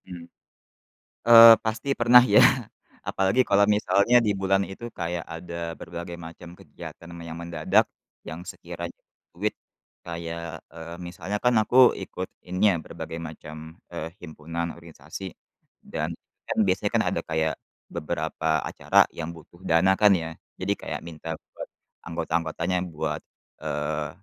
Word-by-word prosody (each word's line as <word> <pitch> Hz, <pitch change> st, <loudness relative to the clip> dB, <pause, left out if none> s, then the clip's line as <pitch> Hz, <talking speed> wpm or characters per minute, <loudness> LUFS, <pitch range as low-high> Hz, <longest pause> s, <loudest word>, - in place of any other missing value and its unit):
Hmm. 90 Hz, -2 st, -9 dB, 1.0 s
Eee, 115 Hz, 0 st, +11 dB
pasti 110 Hz, +4 st, -3 dB
pernah 120 Hz, +1 st, +8 dB
ya, -, -, +9 dB, 0.7 s
apalagi 95 Hz, +6 st, +2 dB
kalau 100 Hz, +1 st, +5 dB
misalnya 105 Hz, +3 st, +4 dB
di 105 Hz, -, +3 dB
bulan 95 Hz, 0 st, +2 dB
itu 95 Hz, +5 st, -8 dB
kayak 85 Hz, 0 st, -2 dB
ada 85 Hz, 0 st, -5 dB
berbagai 85 Hz, 0 st, -7 dB
macam 85 Hz, 0 st, -10 dB
kegiatan 85 Hz, -, -11 dB
me 85 Hz, -, -9 dB
yang 80 Hz, -, -6 dB
mendadak, 85 Hz, -2 st, +2 dB, 0.4 s
yang 80 Hz, +2 st, -6 dB
sekiranya -, -, -7 dB, 0.4 s
duit 100 Hz, +5 st, -1 dB, 0.5 s
kayak 85 Hz, -1 st, -6 dB
eee, 85 Hz, +1 st, -8 dB
misalnya 90 Hz, +4 st, -4 dB
kan 125 Hz, 0 st, +4 dB
aku 120 Hz, +4 st, 0 dB, 0.3 s
ikut 95 Hz, 0 st, -6 dB, 0.2 s
ini 90 Hz, +2 st, -1 dB
ya -, -, 0 dB
berbagai 80 Hz, -, -7 dB
macam, 80 Hz, -1 st, -10 dB, 0.4 s
eee, 80 Hz, -, -4 dB
himpunan 85 Hz, +2 st, -5 dB
organisasi 85 Hz, +2 st, -9 dB, 0.6 s
dan, -, -, -2 dB, 0.4 s
kan -, -, -3 dB
biasanya -, -, +1 dB
kan -, -, +4 dB
ada -, -, -1 dB
kayak 80 Hz, 0 st, +1 dB, 0.4 s
beberapa 80 Hz, 0 st, -3 dB, 0.2 s
acara -, -, -2 dB, 0.2 s
yang 80 Hz, 0 st, -4 dB
butuh 85 Hz, +2 st, -16 dB
dana 85 Hz, +4 st, +5 dB
kan 105 Hz, -1 st, +7 dB
ya, 80 Hz, -, -4 dB, 0.3 s
jadi 100 Hz, +2 st, 0 dB
kayak -, -, -4 dB
minta 80 Hz, -1 st, -9 dB, 0.2 s
buat -, -, -8 dB, 0.4 s
anggota-anggotanya 85 Hz, +2 st, -1 dB, 0.2 s
buat, 75 Hz, -, -3 dB, 0.4 s
eee, 75 Hz, +1 st, -2 dB
85 Hz, 135 wpm, -26 LUFS, 80-95 Hz, 1.0 s, Eee